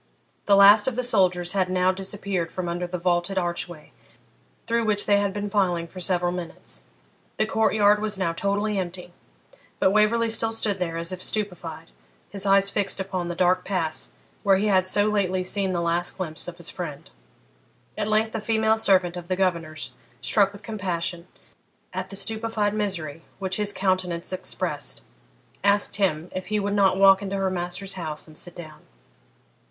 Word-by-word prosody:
The 200 Hz, -, +6 dB
last 205 Hz, +2 st, +8 dB
of 260 Hz, -, 0 dB
the 250 Hz, -, -1 dB
soldiers 185 Hz, -6 st, +1 dB
had 190 Hz, -2 st, +1 dB
now 185 Hz, 0 st, +3 dB
disappeared 190 Hz, -2 st, -3 dB
from 185 Hz, -1 st, -4 dB
under 175 Hz, +1 st, -2 dB
the 180 Hz, +1 st, -4 dB
vaulted 175 Hz, +2 st, 0 dB
archway 175 Hz, -3 st, -3 dB, 0.7 s
through 230 Hz, 0 st, +1 dB
which 210 Hz, -1 st, +1 dB
they 205 Hz, -1 st, +4 dB
had 200 Hz, -1 st, 0 dB
been 205 Hz, +1 st, -3 dB
filing 185 Hz, -5 st, +1 dB
for 185 Hz, -, -10 dB
several 175 Hz, -1 st, 0 dB
minutes; 170 Hz, -, -7 dB, 0.6 s
the 215 Hz, -, +2 dB
court 220 Hz, 0 st, +1 dB
yard 210 Hz, 0 st, +5 dB
was 210 Hz, -2 st, -1 dB
now 175 Hz, -3 st, 0 dB
totally 200 Hz, +3 st, 0 dB
empty, 180 Hz, -1 st, -6 dB, 0.6 s
but 190 Hz, -, +3 dB
Waverley 215 Hz, +3 st, +3 dB
still 225 Hz, 0 st, +3 dB
stood 210 Hz, -3 st, -1 dB
there 165 Hz, -2 st, -2 dB
as 170 Hz, +1 st, -1 dB
if 185 Hz, 0 st, -5 dB
stupefied, 180 Hz, -, -4 dB, 0.4 s
his 200 Hz, 0 st, -5 dB
eyes 195 Hz, 0 st, +5 dB
fixed 200 Hz, -1 st, -1 dB
upon 185 Hz, -2 st, -3 dB
the 175 Hz, -, -4 dB
dark 180 Hz, +1 st, +3 dB
pass 175 Hz, -5 st, -2 dB, 0.3 s
where 195 Hz, -1 st, +4 dB
he 200 Hz, -, 0 dB
had 185 Hz, -2 st, +3 dB
so 205 Hz, +2 st, +3 dB
lately 190 Hz, -3 st, +1 dB
seen 190 Hz, +1 st, 0 dB
the 175 Hz, -2 st, -1 dB
last 170 Hz, +1 st, 0 dB
glimpse 165 Hz, -4 st, -3 dB
of 175 Hz, -1 st, -7 dB
his 170 Hz, -2 st, -8 dB
friend. 150 Hz, -6 st, -7 dB, 0.8 s
At 210 Hz, -1 st, -2 dB
length 215 Hz, +1 st, +1 dB
a 225 Hz, -, -2 dB
female 220 Hz, 0 st, +2 dB
servant 185 Hz, -5 st, +3 dB
of 175 Hz, -1 st, -7 dB
the 185 Hz, -, 0 dB
governor's, 170 Hz, -5 st, -1 dB, 0.3 s
struck 200 Hz, -2 st, +3 dB
with 200 Hz, 0 st, -13 dB
compassion, 180 Hz, -4 st, -3 dB, 0.7 s
at -, -, -4 dB
the 195 Hz, -, -8 dB
stupefied 220 Hz, 0 st, -1 dB
misery 170 Hz, -8 st, -2 dB, 0.2 s
which 190 Hz, -1 st, -2 dB
his 210 Hz, -1 st, +1 dB
countenance 185 Hz, -3 st, -1 dB
expressed, 185 Hz, -, -3 dB, 0.6 s
asked 200 Hz, 0 st, +2 dB
him 175 Hz, -5 st, +1 dB
if 185 Hz, -1 st, -5 dB
he 210 Hz, +2 st, 0 dB
would 200 Hz, 0 st, -1 dB
not 195 Hz, -2 st, +3 dB
walk 195 Hz, 0 st, +7 dB
into 200 Hz, -1 st, -3 dB
her 195 Hz, -1 st, 0 dB
master's 180 Hz, +2 st, -4 dB
house 160 Hz, -5 st, -5 dB
and 155 Hz, -, -15 dB
sit 175 Hz, +2 st, -5 dB
down? 155 Hz, -3 st, -10 dB
190 Hz, 180 wpm, -25 LUFS, 175-205 Hz, 0.8 s, last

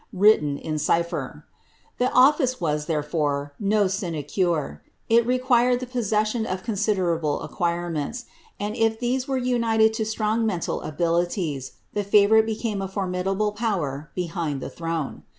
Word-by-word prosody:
written 185 Hz, -8 st, +4 dB
in 155 Hz, 0 st, -3 dB
cipher. 170 Hz, +3 st, -1 dB, 0.5 s
This 250 Hz, +1 st, +2 dB
office 260 Hz, 0 st, +4 dB
was, 150 Hz, -3 st, -1 dB
therefore, 150 Hz, -2 st, -1 dB
no 205 Hz, 0 st, +2 dB
sinecure; 170 Hz, -, -1 dB, 0.3 s
it 230 Hz, 0 st, +4 dB
required 250 Hz, -1 st, +3 dB
the 255 Hz, -, -4 dB
posse 240 Hz, -4 st, -2 dB
aion 215 Hz, +2 st, +1 dB
of 185 Hz, 0 st, -3 dB
considerable 185 Hz, -8 st, 0 dB
acquirements, 175 Hz, -, -2 dB, 0.3 s
and 205 Hz, +1 st, -3 dB
if 225 Hz, -1 st, +1 dB
these 250 Hz, +1 st, -1 dB
were 270 Hz, -1 st, 0 dB
united 230 Hz, -3 st, +2 dB
io -, -, +1 dB
sinuig 220 Hz, +1 st, 0 dB
mental 190 Hz, -7 st, -1 dB
abilities, 165 Hz, -, -1 dB, 0.2 s
tho 205 Hz, -, 0 dB
favourite 210 Hz, +2 st, +5 dB
became 220 Hz, -2 st, -2 dB
a 195 Hz, -, -2 dB
formidable 195 Hz, +2 st, -1 dB
power 170 Hz, -, -2 dB
behind 165 Hz, -5 st, -3 dB
die -, -, -5 dB
throne. 165 Hz, -3 st, -4 dB
195 Hz, 135 wpm, -24 LUFS, 165-225 Hz, 0.5 s, favourite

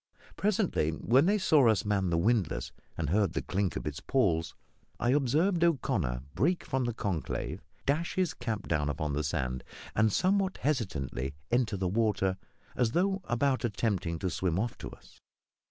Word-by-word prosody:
Presently, 200 Hz, -, +1 dB
when 125 Hz, -, +3 dB
they 205 Hz, +2 st, +4 dB
saw 155 Hz, -, +4 dB
us 105 Hz, -2 st, +2 dB
man 100 Hz, -3 st, +1 dB
the 85 Hz, -, +1 dB
windlass 100 Hz, -1 st, +1 dB, 0.3 s
and 80 Hz, -3 st, -1 dB
heard 100 Hz, -3 st, +2 dB
the 80 Hz, -, -1 dB
clink 95 Hz, -4 st, -1 dB
of 60 Hz, -, -4 dB
its 75 Hz, -2 st, -4 dB
pawls, 85 Hz, -11 st, +1 dB, 0.4 s
I 120 Hz, -, +2 dB
observed 155 Hz, +7 st, +2 dB
O'Connor 100 Hz, -, +1 dB
break 160 Hz, -, +1 dB
from 130 Hz, -2 st, -1 dB
the 120 Hz, -, -1 dB
conclave, 95 Hz, -9 st, -3 dB, 0.2 s
dash 155 Hz, +5 st, 0 dB
his 185 Hz, -4 st, +1 dB
cap 110 Hz, -3 st, -4 dB
down 75 Hz, -2 st, +1 dB
upon 75 Hz, 0 st, -2 dB
the 75 Hz, +2 st, 0 dB
sand, 65 Hz, -5 st, -2 dB, 0.3 s
and 110 Hz, 0 st, +3 dB
somewhat 190 Hz, -, +1 dB
hesitatingly 75 Hz, -, -2 dB, 0.2 s
enter 120 Hz, -4 st, +1 dB
the 95 Hz, -1 st, -1 dB
water, 95 Hz, -2 st, +1 dB, 0.4 s
as 120 Hz, -1 st, +1 dB
though 190 Hz, +2 st, +1 dB
about 130 Hz, +3 st, +1 dB
attempting 100 Hz, -7 st, -1 dB
to 95 Hz, +1 st, -2 dB
swim 90 Hz, 0 st, 0 dB
off 115 Hz, +4 st, -1 dB
to -, -, -6 dB
us. -, -, -16 dB
110 Hz, 170 wpm, -30 LUFS, 85-140 Hz, 0.4 s, they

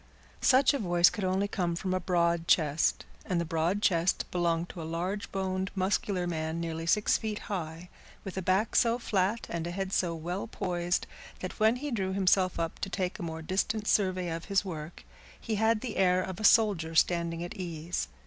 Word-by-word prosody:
Such 265 Hz, +2 st, +5 dB
a 280 Hz, -, -1 dB
voice 175 Hz, -3 st, +4 dB
could 210 Hz, -, -5 dB
only 190 Hz, +2 st, +1 dB
come 175 Hz, -4 st, -1 dB
from 185 Hz, +2 st, -2 dB
a 185 Hz, -, +1 dB
broad 170 Hz, -2 st, +1 dB
chest, 155 Hz, -1 st, +2 dB, 0.2 s
and 180 Hz, -2 st, -1 dB
the 170 Hz, -, -1 dB
broad 165 Hz, +6 st, 0 dB
chest 170 Hz, 0 st, +2 dB
belonged 170 Hz, -1 st, 0 dB
to 170 Hz, -, -7 dB
a -, -, -5 dB
large 175 Hz, +5 st, -3 dB
boned, 190 Hz, 0 st, -2 dB
muscular 190 Hz, -1 st, 0 dB
man 160 Hz, -1 st, -2 dB
nearly 165 Hz, -1 st, -4 dB
six 210 Hz, +5 st, +3 dB
feet 215 Hz, -2 st, -3 dB, 0.2 s
high, 165 Hz, -1 st, -5 dB, 0.4 s
with 195 Hz, -, -7 dB
a 190 Hz, -, -2 dB
back 190 Hz, +4 st, +1 dB
so 235 Hz, -1 st, +4 dB
flat 210 Hz, -1 st, 0 dB
and 170 Hz, 0 st, -3 dB
a -, -, -3 dB
head 190 Hz, +2 st, -3 dB
so 170 Hz, -2 st, +1 dB
well 175 Hz, +6 st, -4 dB
poised 175 Hz, -4 st, -1 dB, 0.4 s
that 185 Hz, -, -6 dB
when 220 Hz, +2 st, +4 dB
he 290 Hz, +3 st, -4 dB
drew 190 Hz, -5 st, -1 dB
himself 185 Hz, -2 st, +2 dB
up 165 Hz, -1 st, -3 dB
to 195 Hz, -, -3 dB
take 185 Hz, 0 st, -2 dB
a -, -, -5 dB
more 160 Hz, -1 st, -5 dB
distant 205 Hz, +5 st, -1 dB
survey 185 Hz, -3 st, +1 dB
of 165 Hz, 0 st, -5 dB
his 200 Hz, -1 st, +1 dB
work, 160 Hz, -2 st, -7 dB, 0.4 s
he 225 Hz, -, -4 dB
had 220 Hz, +1 st, +2 dB
the 245 Hz, -4 st, -5 dB
air 185 Hz, -1 st, +3 dB
of 185 Hz, -1 st, -6 dB
a -, -, -5 dB
soldier 200 Hz, -8 st, +4 dB
standing 170 Hz, 0 st, +2 dB
at 175 Hz, -, -6 dB
ease. 170 Hz, -, -4 dB
185 Hz, 200 wpm, -29 LUFS, 170-200 Hz, 0.4 s, Such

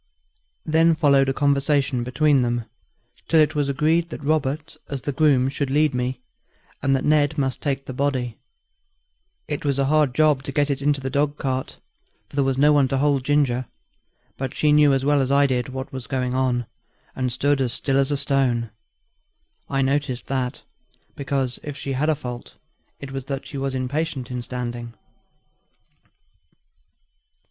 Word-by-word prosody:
Then 165 Hz, +1 st, +4 dB
followed 140 Hz, -4 st, +4 dB
a -, -, +3 dB
conversation 140 Hz, -2 st, +1 dB
between 140 Hz, +3 st, +2 dB
them, 120 Hz, -1 st, -1 dB, 0.6 s
till 165 Hz, -, +4 dB
it 155 Hz, 0 st, +4 dB
was 145 Hz, -2 st, 0 dB
agreed 160 Hz, +5 st, +1 dB
that 150 Hz, -, -8 dB
Robert, 150 Hz, +1 st, -1 dB
as 140 Hz, -3 st, -4 dB
the 145 Hz, -, -1 dB
groom, 135 Hz, -3 st, +3 dB
should 135 Hz, 0 st, -2 dB
lead 150 Hz, +1 st, +2 dB
me, 125 Hz, 0 st, -2 dB, 0.6 s
and 135 Hz, 0 st, +2 dB
that 135 Hz, -, -1 dB
Ned 150 Hz, 0 st, +3 dB
must 135 Hz, -2 st, -1 dB
take 135 Hz, -2 st, -2 dB
the 130 Hz, -, -6 dB
body. 130 Hz, -3 st, -1 dB, 1.1 s
It 145 Hz, -1 st, -4 dB
was 140 Hz, -2 st, 0 dB
a 140 Hz, -, +2 dB
hard 145 Hz, -3 st, +2 dB
job 150 Hz, -2 st, +3 dB
to 140 Hz, -, -6 dB
get 145 Hz, +1 st, +1 dB
it 140 Hz, 0 st, -2 dB
into 145 Hz, 0 st, +1 dB
the 135 Hz, 0 st, -4 dB
dog 145 Hz, +1 st, 0 dB
cart, 130 Hz, -1 st, -3 dB, 0.5 s
for -, -, -14 dB
there 140 Hz, -, +3 dB
was 135 Hz, -1 st, 0 dB
no 150 Hz, +2 st, +5 dB
one 140 Hz, -2 st, +4 dB
to 135 Hz, -, -1 dB
hold 140 Hz, -1 st, +2 dB
Ginger; 130 Hz, -3 st, +1 dB, 0.7 s
but 135 Hz, -1 st, -4 dB
she 150 Hz, -, +2 dB
knew 150 Hz, -1 st, +6 dB
as 135 Hz, 0 st, +1 dB
well 145 Hz, -1 st, +3 dB
as 135 Hz, 0 st, -1 dB
I 140 Hz, 0 st, +5 dB
did 130 Hz, -1 st, -1 dB
what 130 Hz, +1 st, -6 dB
was 130 Hz, -4 st, -6 dB
going 125 Hz, -1 st, -1 dB
on, 125 Hz, -2 st, 0 dB, 0.5 s
and 130 Hz, -1 st, -1 dB
stood 140 Hz, +3 st, +1 dB
as 125 Hz, -3 st, 0 dB
still 135 Hz, +2 st, 0 dB
as 135 Hz, 0 st, +2 dB
a 145 Hz, -, 0 dB
stone. 130 Hz, -5 st, 0 dB, 1.0 s
I 135 Hz, -1 st, +1 dB
noticed 135 Hz, -2 st, -1 dB
that, 130 Hz, -2 st, -3 dB, 0.5 s
because, 135 Hz, -2 st, -2 dB
if 145 Hz, -1 st, -7 dB
she 140 Hz, -1 st, -4 dB
had 145 Hz, +4 st, 0 dB
a 155 Hz, -, +3 dB
fault, 125 Hz, -4 st, -8 dB, 0.4 s
it 140 Hz, -1 st, -8 dB
was 135 Hz, -1 st, -5 dB
that 135 Hz, -1 st, -4 dB
she 140 Hz, -, -6 dB
was 135 Hz, -1 st, -2 dB
impatient 130 Hz, 0 st, -3 dB
in 125 Hz, -1 st, -3 dB
standing. 120 Hz, -1 st, -5 dB
135 Hz, 175 wpm, -23 LUFS, 130-145 Hz, 1.1 s, knew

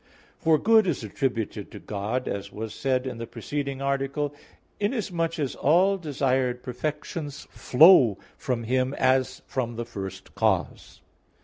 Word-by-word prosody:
For 160 Hz, -1 st, +4 dB
good 220 Hz, +2 st, +4 dB
is 155 Hz, -9 st, -1 dB
attributed 115 Hz, +1 st, -3 dB
to -, -, -10 dB
God, 105 Hz, +5 st, -3 dB
as 100 Hz, 0 st, -4 dB
was 110 Hz, 0 st, -6 dB
said 130 Hz, 0 st, 0 dB
in 125 Hz, -3 st, -5 dB
the 115 Hz, -, -5 dB
preceding 140 Hz, 0 st, -4 dB
article, 140 Hz, +1 st, -1 dB, 0.5 s
inasmuch 190 Hz, -7 st, -1 dB
as 145 Hz, -4 st, -1 dB
all 180 Hz, +7 st, +3 dB
desired 130 Hz, -5 st, 0 dB
perfections 145 Hz, +3 st, -5 dB
flow 130 Hz, -, +6 dB, 0.2 s
from 125 Hz, -3 st, -2 dB
Him 130 Hz, +3 st, 0 dB
as 130 Hz, 0 st, +1 dB
from 120 Hz, -3 st, -3 dB
the 120 Hz, +1 st, -4 dB
first 95 Hz, -4 st, -8 dB
cause. 105 Hz, -5 st, -1 dB
130 Hz, 135 wpm, -26 LUFS, 120-150 Hz, 0.5 s, flow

